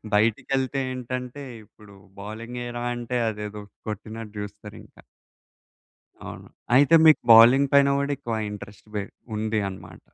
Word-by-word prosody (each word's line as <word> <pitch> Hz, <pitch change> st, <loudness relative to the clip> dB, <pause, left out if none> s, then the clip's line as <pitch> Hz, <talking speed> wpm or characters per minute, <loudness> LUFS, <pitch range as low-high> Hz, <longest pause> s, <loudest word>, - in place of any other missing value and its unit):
బయటికెళ్తే 130 Hz, +5 st, +1 dB
ఏంటంటే 125 Hz, +2 st, -6 dB, 0.2 s
ఇప్పుడు 105 Hz, -1 st, -18 dB, 0.3 s
బౌలింగ్ 115 Hz, +4 st, -7 dB
ఏయిరా 120 Hz, 0 st, -5 dB
అంటే 120 Hz, +1 st, -4 dB
అదేదో 105 Hz, -1 st, -6 dB, 0.3 s
కొట్టినట్టు 110 Hz, +1 st, -7 dB
జూస్తారింక. 105 Hz, 0 st, -10 dB, 1.3 s
అవును. -, -, -9 dB, 0.3 s
అయితే 140 Hz, +5 st, +5 dB
మీకు 155 Hz, -, +7 dB
బౌలింగ్ 125 Hz, +5 st, +7 dB
పైన 140 Hz, 0 st, +6 dB
కూడా 140 Hz, +1 st, -1 dB
ఎక్కువ 120 Hz, -5 st, -4 dB
ఇంట్రస్ట్ 105 Hz, 0 st, -10 dB
పె 105 Hz, -, -1 dB, 0.3 s
ఉంది 110 Hz, 0 st, -1 dB
అనమాట. 95 Hz, -, -11 dB
115 Hz, 120 wpm, -24 LUFS, 105-130 Hz, 1.3 s, మీకు